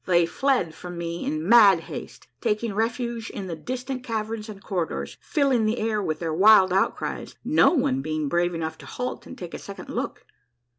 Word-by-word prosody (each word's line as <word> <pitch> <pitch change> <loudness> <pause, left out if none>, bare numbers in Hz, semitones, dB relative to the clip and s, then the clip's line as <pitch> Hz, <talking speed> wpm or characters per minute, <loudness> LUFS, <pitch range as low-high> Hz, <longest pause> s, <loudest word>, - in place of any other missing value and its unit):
They 175 -2 +4
fled 250 - 0
from 175 +2 -8
me 170 0 -4
in 155 +2 -2
mad 205 -6 +7
haste, - - -9
taking 220 -1 0
refuge 230 +1 -2
in 200 - -6
the 175 -3 -4
distant 255 - -5
caverns 220 -1 -3
and 205 -2 -8
cor 180 -5 -2
ridors, - - -5
filling 270 -8 +2
the 220 +3 0
air 215 -2 0
with 155 -5 -2
their 165 -1 -3
wild 190 +1 +6
outcries, 195 - -1
no - - +5
one 135 - +1
being 155 0 -2
brave 175 +3 +1
enough 160 -1 -4
to - - -12
halt 250 0 -5
and 260 - -10
take 175 -2 -8
a - - -5
second 200 - -9
look. - - -4
200 Hz, 195 wpm, -25 LUFS, 170-230 Hz, -, mad